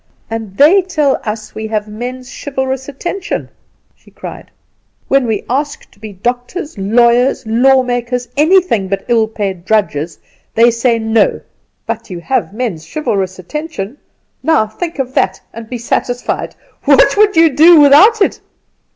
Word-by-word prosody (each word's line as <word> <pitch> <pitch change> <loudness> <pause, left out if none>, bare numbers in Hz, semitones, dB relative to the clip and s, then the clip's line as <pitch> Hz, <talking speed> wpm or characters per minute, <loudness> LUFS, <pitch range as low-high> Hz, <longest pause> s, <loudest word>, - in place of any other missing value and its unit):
"And 220 -4 -6
they 335 +8 +6
tell 305 -7 0
us 215 0 -5
we 220 0 -5
have 215 -1 -2
men's 245 +4 -7
chivalrous 265 -1 -3
attention!" 350 +7 -4 0.5
she - - -22
cried. - - -10 0.6
"When 270 -2 +3
we 215 -3 -1
ask 285 +4 -3
to - - -25
be 215 0 -8
doctors, 245 - -4
lawyers, 235 +6 +2
law 260 +4 +3
makers, 245 0 -2
anything 315 - +3
but 195 +1 -3
ill 230 -2 +2
paid 195 -5 -4
drudges, 180 -6 -1 0.4
they 235 +1 +5
say 235 0 +1
No; 220 -1 +1 0.5
but 230 0 -5
you 180 -2 -6
have 260 +7 -1
men's 210 -8 -4
chivalrous 195 -11 -2
attention; 235 - -6 0.5
now 320 -9 +2
think 330 +11 -6
of 260 -2 -3
that 190 -5 0
and 225 0 -9
be 250 - -4
satisfied! 245 +1 -2 0.3
What - - +5
would 420 -2 +3
you 325 -1 +5
do 320 +4 +7
without 375 +10 +6
it?" - - -2
245 Hz, 150 wpm, -14 LUFS, 215-285 Hz, 0.6 s, do